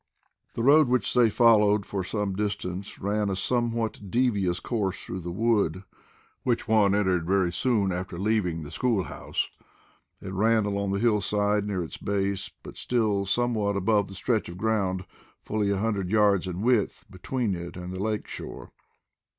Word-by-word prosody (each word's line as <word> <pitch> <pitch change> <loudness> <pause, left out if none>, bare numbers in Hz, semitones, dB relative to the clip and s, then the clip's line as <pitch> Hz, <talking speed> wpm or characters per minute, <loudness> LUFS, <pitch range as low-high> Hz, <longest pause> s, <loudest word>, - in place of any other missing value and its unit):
The 115 - -2
road 145 +2 +6
which 125 -5 +1
they 120 -2 +5
followed 105 -3 +4
for 95 -2 -3
some 100 0 -2
distance 100 -2 -4
ran 105 +1 0
a 95 - -1
somewhat 115 -1 -1
devious 100 -7 +1
course 100 -3 -2
through 95 - -5
the 85 0 -5
wood, 100 -3 +1 0.6
which 120 -2 -1
one 105 -3 +4
entered 95 -5 +1
very 95 -2 +2
soon 100 -1 +1
after 90 -1 -4
leaving 95 -5 0
the 75 - -9
school 115 -7 +1
house. - - -4 0.7
It 95 - -7
ran 110 +2 +3
along 100 -1 -1
the 100 - 0
hillside, 105 -2 +1
near 95 -4 -1
its 80 - -8
base, 100 -1 -1
but - - -10
still 105 -5 0
somewhat 105 -1 +1
above 100 +1 +2
the 95 - -10
stretch 110 +1 -1
of 85 - -8
ground, 95 -3 0 0.4
fully 105 -1 -1
a 100 - +1
hundred 100 -3 -1
yards 100 -3 +3
in 90 +2 -4
width, 120 -4 +1
between 105 +4 -2
it 85 0 -6
and 90 0 -6
the 95 - -4
lake 105 0 -1
shore. - - -8
100 Hz, 165 wpm, -26 LUFS, 95-110 Hz, 0.7 s, road